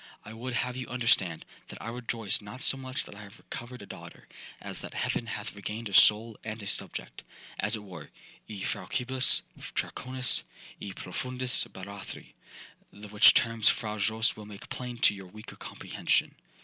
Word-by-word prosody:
'I 110 - -8
would 120 +3 -5
have 125 +1 -1
you 130 -1 -5
understand, 115 -9 +2 0.2
that - - -10
I 115 - -5
rejoice 115 -4 +2
not 105 +5 -9
so - - +1
much 130 -1 -4
that - - -11
I 105 - -10
have 100 -1 -12
recovered 125 +1 -8
a - - -9
daughter, - - -11 0.3
as - - -5
that - - -8
heaven 115 - 0
hath 105 -1 -4
regained 105 +2 -5
a - - -9
soul 110 +3 +6
and 110 0 -5
a - - -7
subject, - - -3 0.4
as 105 +3 +2
it 105 - -7
were, 90 -6 -10 0.4
e 100 -3 -6
faucibus 130 +1 +3 0.3
Draconis—e 125 -5 -1
profundis 125 +8 +1
Barathri—the 100 +1 -11
which 105 0 +8
terms 115 -2 +4
Fra 105 -2 -1
Jose 110 +2 +2
will 105 -1 -10
make 105 +1 -11
plain 125 -1 -4
to 115 - +5
your 95 -2 -9
weaker 105 +4 -11
comprehension. - - -1
110 Hz, 165 wpm, -29 LUFS, 105-125 Hz, 0.4 s, which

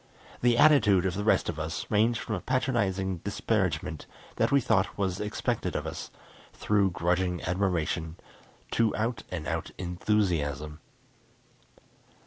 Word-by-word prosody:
The 120 -1 +3
attitude 115 - +5
of 95 - 0
the 100 +2 -3
rest 110 - +3
of 80 -2 -3
us 80 +1 -3
ranged 110 +2 +3
from - - -4
a - - -1
patronizing 100 -8 0
disparagement 80 -1 -2 0.3
that - - +2
we 140 - +5
thought 100 -6 +1
was 95 -1 -1
expected 105 0 -2
of - - -2
us, - - -6 0.4
through 100 -2 +2
grudging 90 0 0
admiration, 90 -3 -1 0.6
to 115 -2 +2
out 115 +2 -1
and 85 -4 -5
out - - -2
enthusiasm. 85 -6 -1
95 Hz, 130 wpm, -28 LUFS, 85-110 Hz, 0.6 s, attitude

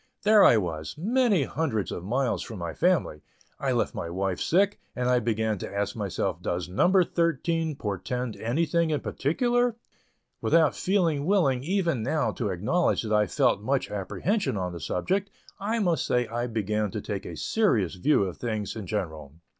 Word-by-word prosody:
There 210 0 +6
I 115 - +7
was, 80 -6 -3
many 215 - +2
hundreds 130 - -2
of 85 - -5
miles 125 +6 0
from 115 - -7
my 85 -2 -4
family; 170 - +1 0.4
I - - 0
left - - 0
my 85 - -4
wife 95 +1 -2
sick, 195 +4 +2 0.2
and 125 0 -1
I 125 0 +4
began 110 -2 -1
to - - -6
ask 100 0 -2
myself 95 -4 -2
does 90 0 -2
"number 180 - +4
thirteen" 165 -1 0
portend 115 +2 -3
anything 165 +7 0
in 150 -2 0
particular? 240 - +1 0.7
Without 165 -2 +3
feeling 170 -7 +1
willing 140 -11 +2
even 170 - 0
now 140 +6 0
to 110 -5 -3
acknowledge 110 - +1
that 110 -1 -2
I 105 -1 +3
felt 100 - +2
much 135 +5 -1
apprehension 105 - -1
on 90 -2 -3
the 85 - -6
subject, 190 - -1 0.3
I 215 +4 -1
must 180 -7 +1
say 125 0 +2
I 120 +2 -3
began 105 -2 -1
to 105 - -4
take 100 -1 -5
a - - -7
serious 120 - +1
view 100 +6 +2
of 95 -3 -4
things 110 -4 -3
in 105 -4 -6
general. 80 -9 -4
125 Hz, 175 wpm, -27 LUFS, 100-170 Hz, 0.7 s, I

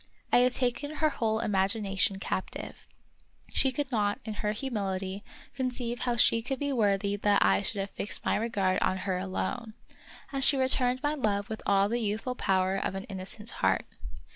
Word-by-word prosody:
I - - +7
had 250 0 +3
taken 265 +4 -1
her 310 0 +2
whole 220 -3 0
imagination 195 0 +1
captive. 190 -1 -5 0.6
She 265 - +2
could 275 +1 -3
not, 205 -3 +1
in 220 - -4
her 210 0 -1
humility, 200 -5 -3 0.3
conceive 245 -2 -2
how 245 -1 0
she 230 0 +4
could 260 +3 -3
be 285 0 -1
worthy 200 -3 +1
that 205 0 +3
I 95 0 +4
should 195 - -1
have 195 - -5
fixed 205 - -3
my - - +2
regard 200 -5 0
on 185 - +1
her 185 -2 0
alone; 215 +4 -3 0.6
and 275 -1 +1
she 275 - +6
returned 260 0 +3
my 295 +1 +1
love 205 -8 -1
with 220 - -4
all 200 0 +4
the 235 +3 -1
youthful 220 +4 -1
power 190 -4 +1
of 195 - -2
an 195 - -4
innocent 200 +4 -6
heart. - - +1
215 Hz, 180 wpm, -29 LUFS, 195-250 Hz, 0.6 s, I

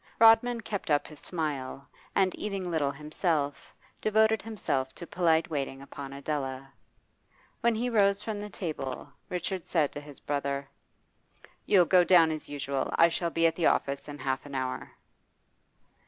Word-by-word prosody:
Rodman 230 +1 +6
kept 205 -5 -4
up 145 -1 +3
his 150 -2 -12
smile, 140 -5 -4 0.3
and, 190 -1 +3
eating 195 -4 -3
little 150 -4 +1
himself, 150 -1 -2 0.3
devoted 220 +1 +3
himself 155 -12 -2
to 170 - -8
polite 165 -1 +2
waiting 135 -2 -2
upon 140 0 -8
Adela. 135 -1 -4 0.9
When 235 -1 +2
he 235 +3 -1
rose 200 -4 +3
from 210 -1 -4
the 210 - -6
table, 145 -7 -5 0.2
Richard 180 0 -3
said 155 -5 +2
to 145 - -7
his 145 -1 -12
brother 140 -1 -2 1.0
'You'll 185 -4 +6
go 180 +1 +5
down 170 -3 +6
as 155 -1 -5
usual. 140 -2 -2
I 170 - +6
shall 170 +1 -1
be 165 0 +1
at 165 - +3
the 170 - +2
office 140 0 0
in 145 -1 -7
half 130 -1 -2
an 140 - -7
hour. 130 -1 -3
160 Hz, 155 wpm, -29 LUFS, 140-190 Hz, 1.0 s, Rodman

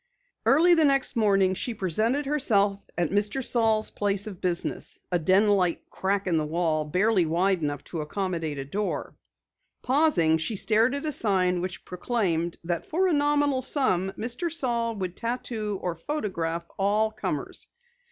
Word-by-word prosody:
Early 335 +6 +6
the 325 -2 +4
next 275 -2 +3
morning 195 -4 +3
she 230 +5 -3
presented 220 - 0
herself 205 -9 +1
at 175 -3 0
Mr. 210 +6 0
Saal's 220 -2 +1
place 205 0 0
of 200 -5 -8
business, 175 -2 -2
a 175 - +2
den 185 +6 +4
like 190 -4 +1
crack 195 +1 -1
in 175 -3 +1
the 155 - +1
wall, 160 -1 0
barely 185 +3 +2
wide 180 +3 +1
enough 145 -2 -3
to 165 - -5
accommodate 165 -2 -3
a 135 - -4
door. 200 +9 -3 0.7
Pausing, 250 - +3
she 165 +7 -2
stared 225 +6 +2
at 280 - -4
a 305 - 0
sign 185 -8 +1
which 185 0 -5
proclaimed 180 -4 -1
that 170 0 -3
for 370 +4 +1
a - - +1
nominal 290 -2 +2
sum 215 - 0
Mr. 245 +10 -3
Saal 235 -7 -1
would 185 -3 -4
tattoo 230 -3 -3
or 180 - -1
photograph 170 - -3
all 210 +3 +2
comers. 215 - -4
200 Hz, 160 wpm, -26 LUFS, 175-240 Hz, 0.7 s, Early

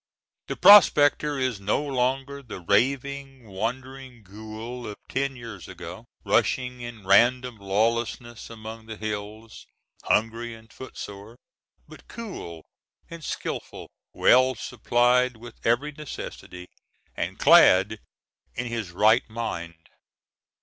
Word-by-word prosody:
The - - -3
prospector 150 -7 +6
is 130 -5 -1
no 100 +8 0
longer 135 +1 -1
the 120 -7 -9
raving, 135 +5 -1
wandering 125 +4 -6
ghoul 110 +5 -8
of 105 - -6
ten 135 0 -2
years 115 - -9
ago, - - -9 0.2
rushing 125 -1 +1
in 120 -4 -9
random 120 +4 +3
lawlessness 115 +4 -2
among 110 0 -9
the 110 -1 -7
hills, 110 +1 -7 0.4
hungry 115 +1 0
and 110 0 -18
footsore; 105 -3 -9 0.5
but - - -15
cool 135 - -8 0.5
and 170 -1 -9
skillful, - - -6 0.2
well 130 +1 +4
supplied 120 +2 +1
with 120 +1 -13
every 120 +6 +1
necessary, 115 -11 -9 0.5
and - - -4
clad 100 +4 +6 0.6
in 125 - -3
his 115 -5 -4
right 110 +8 +3
mind. 85 -8 -5
120 Hz, 110 wpm, -25 LUFS, 110-130 Hz, 0.6 s, prospector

